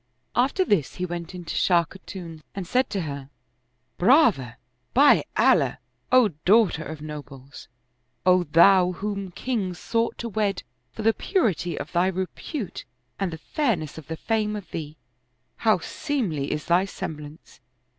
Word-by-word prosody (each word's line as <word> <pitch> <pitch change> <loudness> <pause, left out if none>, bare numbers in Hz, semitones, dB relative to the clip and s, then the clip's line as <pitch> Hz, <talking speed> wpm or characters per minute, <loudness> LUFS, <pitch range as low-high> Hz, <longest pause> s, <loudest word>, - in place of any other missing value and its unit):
After 275 +10 +2
this 190 - +1
he 180 - -2
went 175 0 -6
in 175 -1 -8
to 160 - -4
Shah 175 -2 +4
Khatun 175 -3 -10
and 195 -2 -4
said 250 +9 +1
to 195 - -2
her, 140 -4 -6 0.3
" 125 +1 -47
Brava, 185 - +4 0.4
by 285 +3 +6
Allah, - - +4 0.3
O 255 -4 +6
daughter 195 -5 +4
of 155 -1 -8
nobles. 145 -3 -9 0.6
O 185 -1 +4
thou 180 +3 +5
whom 200 0 -4
kings 190 -3 -3
sought 230 0 -1
to 235 - -4
wed, 205 -3 -1 0.3
for 220 - -7
the 225 +1 +4
purity 210 - 0
of - - -6
thy 175 +1 +2
repute 190 - -4 0.4
and 195 -3 -1
the 160 - -6
fairness 165 - -2
of 155 - -14
the 160 - -5
fame 215 +1 -1
of 205 -3 -6
theel 155 -3 -6 0.6
How 220 -3 +3
seemly 180 - -2
is 150 - -3
thy 175 +3 +3
semblance 150 -6 -8
185 Hz, 155 wpm, -25 LUFS, 160-215 Hz, 0.6 s, by